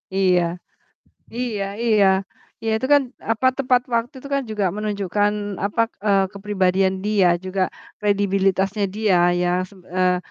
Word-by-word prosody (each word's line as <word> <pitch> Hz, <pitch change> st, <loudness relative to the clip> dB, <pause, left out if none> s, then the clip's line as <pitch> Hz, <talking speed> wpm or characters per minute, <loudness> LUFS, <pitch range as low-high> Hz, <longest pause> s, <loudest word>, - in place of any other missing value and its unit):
Iya, 185 Hz, -2 st, +3 dB, 0.9 s
iya 230 Hz, -5 st, -2 dB, 0.2 s
iya. 215 Hz, -4 st, +4 dB, 0.6 s
Iya 225 Hz, -, -1 dB
itu 260 Hz, -, -1 dB
kan, 285 Hz, -, +5 dB, 0.3 s
apa, 225 Hz, +3 st, +1 dB
tepat 250 Hz, -2 st, +2 dB
waktu 230 Hz, +5 st, -1 dB
itu 280 Hz, -, -9 dB
kan 275 Hz, -, +1 dB
juga 210 Hz, -2 st, -1 dB
menunjukkan 205 Hz, -1 st, 0 dB, 0.3 s
apa, 205 Hz, +3 st, -1 dB, 0.3 s
eee, 195 Hz, -1 st, +4 dB
kepribadian 190 Hz, -2 st, +1 dB
dia 205 Hz, -4 st, +3 dB, 0.2 s
juga 185 Hz, 0 st, -1 dB, 0.4 s
kredibilitasnya 195 Hz, 0 st, +1 dB
dia 215 Hz, -4 st, +2 dB, 0.2 s
ya. 180 Hz, -, +1 dB, 0.2 s
Seb 195 Hz, -2 st, -17 dB
eee, 185 Hz, 0 st, +1 dB
205 Hz, 135 wpm, -21 LUFS, 190-220 Hz, 0.9 s, kan